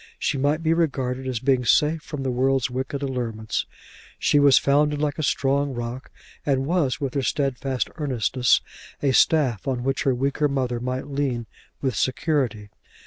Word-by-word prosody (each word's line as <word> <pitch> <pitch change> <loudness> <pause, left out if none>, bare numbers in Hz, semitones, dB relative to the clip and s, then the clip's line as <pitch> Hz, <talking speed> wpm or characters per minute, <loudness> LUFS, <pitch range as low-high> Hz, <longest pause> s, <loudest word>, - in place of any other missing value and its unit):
She - - -1
might 145 +4 +1
be 160 0 +3
regarded 130 -6 -1
as 125 -3 -2
being 130 0 +2
safe 150 +5 +3
from 150 -3 -6
the 130 - -1
world's 130 0 +1
wicked 130 +2 -3
allurements. 115 -5 -3 0.5
She 145 - +3
was 145 -2 +6
founded 145 +1 +2
like 150 +1 -1
a - - +1
strong 140 -1 +1
rock, 120 +2 -5 0.3
and 135 -2 +1
was, 155 -5 0
with 140 -3 -3
her 140 - 0
stedfast 135 +1 -1
earnestness, 130 -3 +2 0.4
a 140 - +3
staff 130 - +3
on 125 -2 -1
which 135 0 0
her 135 -3 +2
weaker 140 +3 +1
mother 130 -4 -1
might 125 +1 -3
lean 135 -4 -2 0.4
with 130 -5 0
security. 130 -6 -1
135 Hz, 165 wpm, -24 LUFS, 125-145 Hz, 0.5 s, was